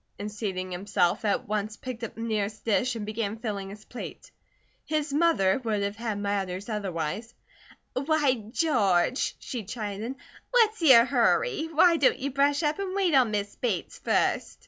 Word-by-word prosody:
and 205 +1 -5
seating 190 -3 -4
himself, 180 -1 0
at 205 -2 0
once 215 +1 -2
picked 250 -2 -7
up 230 - -5
the 225 - -7
nearest 215 -2 -2
dish 235 +3 +1
and 215 -2 -4
began 215 0 -3
filling 205 -4 -4
his 210 +2 -11
plate. 250 - -9 0.5
His 305 -2 -2
mother 280 - +3
would 215 -3 0
have 200 +1 -2
had 225 -2 -3
matters 200 -1 -2
otherwise. 205 +1 -3 0.6
"Why, 285 0 +2 0.2
George," 235 - +2
she 240 -4 -6
chided. 215 +3 -5 0.3
"What's 445 -5 +3
your 260 -7 +8
hurry? 315 - +2
Why 335 +2 +5
don't 280 - +3
you 280 +2 -3
brush 285 +3 +2
up 300 +4 0
and 385 -1 -3
wait 380 -5 +2
on 255 -4 +5
Miss 205 -1 -3
Bates 210 -9 -2
first?" - - 0
225 Hz, 165 wpm, -27 LUFS, 205-280 Hz, 0.6 s, your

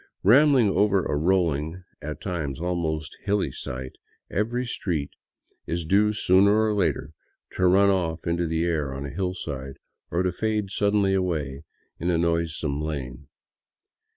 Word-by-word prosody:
Rambling 130 +2 +6
over 100 -1 +2
a - - -1
rolling, 85 0 0 0.2
at 75 +1 -6
times 80 -9 -3
almost 80 -3 -2
hilly 100 -1 0
site, 65 +1 -7 0.3
every 120 +6 -1
street 85 -11 -2 0.6
is 85 0 -2
due 105 +5 +3
sooner 100 +1 +4
or 110 -1 +2
later 80 -7 0 0.4
to 95 - +2
run 100 +2 +5
off 85 -4 -1
into 85 0 0
the 80 +1 0
air 75 -6 -1
on 70 +1 -5
a 70 - -5
hillside, 75 -6 -4 0.3
or 90 +2 0
to 90 - +1
fade 105 0 -1
suddenly 100 -1 +2
away 80 -7 -2 0.3
into 85 0 +1
a - - +2
noisome 80 -3 0
lane. 70 -3 -5
85 Hz, 145 wpm, -25 LUFS, 75-100 Hz, 0.6 s, Rambling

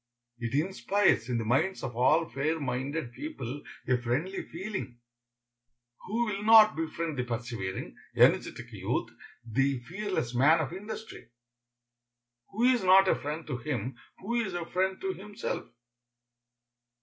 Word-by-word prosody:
It 115 +2 -3
inspires 190 - +2
in 120 - +1
the 115 - -2
minds 155 - +1
of 125 -3 -4
all 155 +7 +4
fair 155 +4 -1
minded 135 +1 -3
people 145 - -6 0.3
a 125 - +3
friendly 145 +11 -1
feeling. 185 - -6 1.1
Who 230 +5 0
will 205 -3 -3
not 220 -1 +8
befriend 160 -2 -3
the - - +1
persevering, 115 -5 -4 0.2
energetic - - +3
youth, - - -2 0.3
the 135 +4 +1
fearless 175 - -3
man 145 +7 +5
of 160 +1 -2
industry? 210 - -8 1.2
Who 220 +4 -2
is 250 -4 +4
not 190 +1 +7
a - - +4
friend 150 +3 -5
to 135 -5 -3
him 125 -2 -3 0.2
who 235 +5 -1
is 190 -4 -4
a 175 -1 -3
friend 190 +2 0
to 190 0 -1
himself? 205 +4 -5
160 Hz, 135 wpm, -29 LUFS, 125-195 Hz, 1.2 s, not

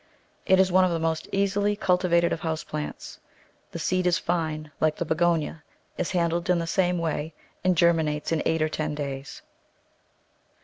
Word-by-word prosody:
It 190 -1 +5
is 190 -1 +4
one 185 +1 +5
of 185 - +3
the 170 - 0
most 160 -1 -1
easily 200 +1 +1
cultivated 180 -3 +2
of - - -3
house 160 -1 -3
plants. 150 -1 -6 0.5
The - - -6
seed 185 0 0
is 180 0 +3
fine 155 -4 -2
like 155 -1 +2
the 175 - -3
Begonia, 160 -1 0 0.3
is - - -2
handled 170 -1 0
in 180 - +4
the 165 - -1
same 180 +1 +1
way, 160 -1 -3 0.3
and 185 -2 +2
germinates 160 -3 +2
in 160 -2 +1
eight 160 -1 +1
or 155 - 0
ten 155 -1 -3
days. 140 -2 -6
170 Hz, 175 wpm, -26 LUFS, 155-180 Hz, 0.5 s, It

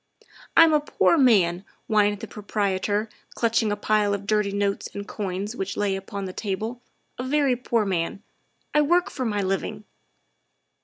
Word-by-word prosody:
" - - -16
I'm 330 -1 +8
a 300 - +5
poor 295 +3 +2
man," 195 - +4 0.2
whined 210 -2 +2
the - - -6
proprietor, 205 0 -1 0.3
clutching 230 -2 +1
a - - +1
pile 205 -1 +1
of 200 0 -7
dirty 210 -1 +1
notes 200 0 -1
and 200 +1 -5
coin 195 -2 -3
which 195 -5 -4
lay 200 -2 +1
upon 195 +1 -5
the 185 - -6
table, 220 +5 -4
' - - -45
' - - -46
a - - -2
very 275 -1 +2
poor 235 -3 0
man. 185 +1 -2 0.5
I 300 - +5
work 345 +4 +2
for 260 - -3
my 205 -3 0
living. 195 +2 -2
210 Hz, 175 wpm, -25 LUFS, 200-235 Hz, 0.5 s, I'm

